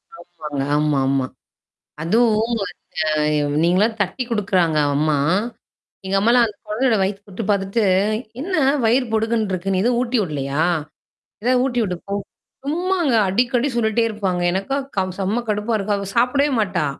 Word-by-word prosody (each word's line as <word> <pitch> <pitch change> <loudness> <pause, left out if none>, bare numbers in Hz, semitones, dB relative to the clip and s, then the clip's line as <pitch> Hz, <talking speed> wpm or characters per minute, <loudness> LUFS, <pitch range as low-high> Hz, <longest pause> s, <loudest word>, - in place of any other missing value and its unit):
ஆமாங்க. 155 -5 -7
ஆமாமா. 135 -3 +1 0.8
அதுவும் 225 +4 +2
அந்த 150 -3 -1
நீங்களலாம் 205 +6 +2
தட்டி 200 +7 -3
குடுக்குறாங்க 185 -7 +1 0.2
அம்மா. 150 0 +2 0.9
எங்க 195 +1 -1
அம்மாலாம் 235 +3 +4
அந்த 210 - -10
கொழந்தயோட 225 +1 +1
வயித்து 195 +1 -1
தொட்டு 200 +3 -6
பார்த்துட்டு 200 +3 0 0.6
"என்ன 370 +4 -4 0.3
வயிறு 250 +3 +3
பொடுக்குன்னு 220 -2 0
இருக்கு. 190 +2 -2
நீ 185 - +1
ஏதோ 245 - +3
ஊட்டி 250 0 0
விடலையா? 145 -3 -1 0.8
ஏதாவ 250 0 +3
ஊட்டி 245 -2 -1
விட்டு 180 -3 -3
போ." 200 - -3 0.5
சும்மாங்க. 345 -2 0 0.2
அடிக்கடி 245 +5 +1
சொல்லிட்டே 230 0 +1
இருப்பாங்க. 190 -4 -2
எனக்கா 195 +9 -1 0.2
க - - +4 0.2
செம்ம 210 +5 -1
கடுப்பா 210 +2 -1
இருக்கும். 205 0 -1
அவ 200 -1 -5
சாப்பிடவே 275 +4 +3
மாட்டா. 185 -7 0
205 Hz, 140 wpm, -21 LUFS, 175-235 Hz, 0.9 s, அம்மாலாம்